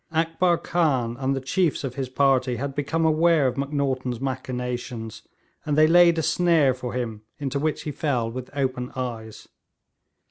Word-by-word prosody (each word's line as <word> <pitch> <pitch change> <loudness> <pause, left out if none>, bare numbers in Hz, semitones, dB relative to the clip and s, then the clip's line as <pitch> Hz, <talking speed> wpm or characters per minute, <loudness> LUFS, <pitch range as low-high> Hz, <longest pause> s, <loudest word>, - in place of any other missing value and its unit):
Akbar 165 +2 +2
Khan 135 -11 0
and 135 0 0
the - - -1
chiefs 155 +5 0
of 135 -3 -3
his 130 -1 -4
party 130 -2 +2
had 140 +2 -4
become 145 +4 -1
aware 160 -1 +3
of 125 - +1
Macnaghten's 135 -3 -2
machinations, 125 -3 -4 0.4
and 150 -1 -1
they 155 - +7
laid 170 +1 +6
a 160 - 0
snare 165 -7 +3
for 125 -1 -6
him 115 -4 -4 0.2
into 140 0 -2
which 155 +1 -1
he 150 - -3
fell 125 -6 -1
with 125 +1 -7
open 130 -2 -2
eyes. 115 -4 -6
135 Hz, 165 wpm, -24 LUFS, 125-155 Hz, 0.4 s, they